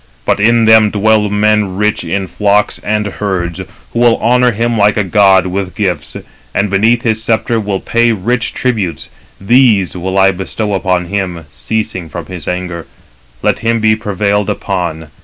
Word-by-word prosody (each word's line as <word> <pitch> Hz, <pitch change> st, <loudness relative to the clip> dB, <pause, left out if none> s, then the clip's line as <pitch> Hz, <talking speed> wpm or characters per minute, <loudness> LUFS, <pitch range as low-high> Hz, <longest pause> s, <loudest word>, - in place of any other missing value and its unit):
But -, -, +1 dB
in 115 Hz, +2 st, +3 dB
them 110 Hz, -1 st, +6 dB
dwell 105 Hz, 0 st, +2 dB
men 105 Hz, -2 st, +1 dB
rich 105 Hz, -1 st, 0 dB
in 95 Hz, +3 st, -2 dB
flocks 100 Hz, +3 st, 0 dB
and 105 Hz, 0 st, -1 dB
herds, 95 Hz, -4 st, -3 dB, 0.3 s
who 115 Hz, -, -1 dB
will 120 Hz, -1 st, +4 dB
honour 125 Hz, +2 st, +3 dB
him 115 Hz, +2 st, -1 dB
like 105 Hz, 0 st, +2 dB
a 105 Hz, -, +2 dB
god 95 Hz, -1 st, +4 dB
with 95 Hz, 0 st, -4 dB
gifts, 90 Hz, -8 st, -2 dB, 0.4 s
and 100 Hz, 0 st, 0 dB
beneath 115 Hz, +5 st, +2 dB
his 110 Hz, -3 st, 0 dB
sceptre 115 Hz, +1 st, 0 dB
will 100 Hz, -2 st, -2 dB
pay 115 Hz, 0 st, +1 dB
rich 115 Hz, +4 st, -1 dB
tributes. 95 Hz, -, -2 dB, 0.3 s
These 105 Hz, -3 st, +3 dB
will 95 Hz, +2 st, -3 dB
I 95 Hz, 0 st, +5 dB
bestow 100 Hz, +3 st, -4 dB
upon 90 Hz, -2 st, 0 dB
him, 90 Hz, -3 st, -4 dB
ceasing 85 Hz, -, -4 dB
from 85 Hz, +1 st, -7 dB
his 90 Hz, -5 st, -9 dB
anger. 90 Hz, -2 st, -4 dB, 0.6 s
Let -, -, +1 dB
him 115 Hz, 0 st, 0 dB
be 110 Hz, 0 st, +3 dB
prevailed 105 Hz, -1 st, -1 dB
upon. 85 Hz, -6 st, -3 dB
105 Hz, 165 wpm, -13 LUFS, 95-110 Hz, 0.6 s, them